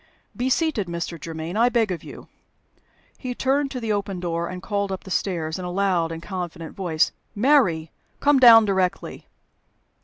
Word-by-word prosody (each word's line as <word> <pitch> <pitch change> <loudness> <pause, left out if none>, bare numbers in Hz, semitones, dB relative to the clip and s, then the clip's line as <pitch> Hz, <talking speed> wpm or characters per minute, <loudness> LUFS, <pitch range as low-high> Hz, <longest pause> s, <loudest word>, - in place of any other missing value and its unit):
"Be 250 +2 -1
seated, 270 - 0
Mr. 170 -1 -5
Germaine, 165 +2 -5
I 235 +3 +4
beg 230 -5 +1
of 175 - -4
you." - - -11 0.9
He 250 -2 -5
turned 275 +2 +1
to 260 - -5
the 225 -3 -1
open 200 -2 -3
door, 170 -1 -2
and 180 0 -7
called 200 -1 -2
up 190 - -5
the 190 - -10
stairs, 170 -4 -2
in 180 - -5
a - - -4
loud 180 -3 0
and 165 0 -7
confident 175 -4 -6
voice: 170 -4 +1 0.2
"Mary! 205 - +3 0.3
come 285 -1 +4
down 230 -3 +9
directly." 190 -1 -2
190 Hz, 175 wpm, -23 LUFS, 170-230 Hz, 0.9 s, down